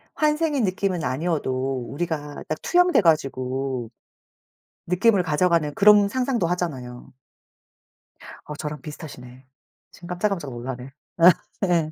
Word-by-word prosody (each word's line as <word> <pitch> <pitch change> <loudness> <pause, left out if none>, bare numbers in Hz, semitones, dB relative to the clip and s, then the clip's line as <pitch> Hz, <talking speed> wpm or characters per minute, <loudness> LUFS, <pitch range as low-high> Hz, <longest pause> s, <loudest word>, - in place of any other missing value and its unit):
환생인 300 -3 +1
느낌은 185 -3 -1
아니어도 135 -4 -1
우리가 150 -2 -4
딱 155 - -4
투영돼 355 -4 +4
가지고 135 - 0 1.0
느낌을 185 +2 +3
가져가는 165 -1 +1
그런 205 0 +6
상상도 245 -3 0
하잖아요. 135 -9 -4 1.3
어 150 - -7
저랑 150 -1 -6
비슷하시네. 130 -5 -10 0.5
지금 175 - -13
깜짝깜짝 180 -4 -2
놀라네. 125 +2 -6 0.7
예. 170 -4 +1
160 Hz, 270 characters per minute, -24 LUFS, 135-185 Hz, 1.3 s, 그런